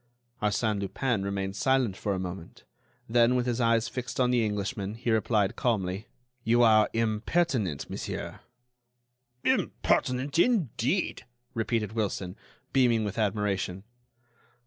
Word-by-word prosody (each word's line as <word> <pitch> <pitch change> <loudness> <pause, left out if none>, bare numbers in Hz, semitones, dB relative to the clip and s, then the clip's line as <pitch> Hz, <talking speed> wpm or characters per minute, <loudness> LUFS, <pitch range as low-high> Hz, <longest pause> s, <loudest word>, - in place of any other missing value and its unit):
Arsène 105 0 +1
Lupin 115 +2 -1
remained 100 0 -3
silent 130 -2 +2
for 100 0 -2
a - - -3
moment; 90 -1 -7 0.4
then, 120 +2 +4
with 125 -1 +1
his 125 0 -1
eyes 115 -1 +3
fixed 125 -1 -5
on 125 -1 +3
the 120 -2 +3
Englishman, 105 0 -2
he 115 0 -2
replied, 110 -2 +2
calmly: 100 -4 -1 0.4
"You 120 +1 +4
are 110 -2 +5
impertinent, 110 - 0
monsieur." - - -5 1.0
"Impertinent, 130 +5 +1
indeed!" 175 - +1 0.3
repeated 110 -2 -1
Wilson, 100 -4 -2 0.4
beaming 120 -4 +3
with 105 +1 -3
admiration. 100 -3 -1
110 Hz, 120 wpm, -28 LUFS, 100-125 Hz, 1.0 s, are